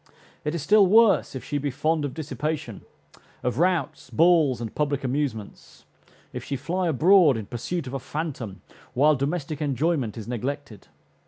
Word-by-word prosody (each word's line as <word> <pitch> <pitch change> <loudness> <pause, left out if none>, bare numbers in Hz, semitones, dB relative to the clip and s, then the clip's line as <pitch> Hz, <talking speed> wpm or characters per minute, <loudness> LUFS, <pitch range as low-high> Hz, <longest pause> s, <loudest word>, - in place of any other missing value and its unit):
It 150 +2 -2
is 165 - -3
still 205 +2 +5
worse 220 -5 +4
if 130 - -6
she 145 - -2
be 145 +1 -2
fond 155 +3 0
of 135 - -5
dissipation, 150 -4 -4 0.6
of 125 +3 -1
routs, 175 -7 0
balls, 155 -1 +3
and 115 -2 -6
public 145 -2 -1
amusements; 130 -5 -4 0.5
if - - -5
she 140 - -4
fly 175 +7 -2
abroad 165 - +5
in 110 - -5
pursuit 135 - -4
of 130 - -7
a 135 - -2
phantom 130 - -5 0.3
while 150 +4 +5
domestic 145 +2 -3
enjoyment 140 -4 -1
is 110 - -7
neglected. 125 -2 -5
145 Hz, 160 wpm, -25 LUFS, 125-165 Hz, 0.6 s, still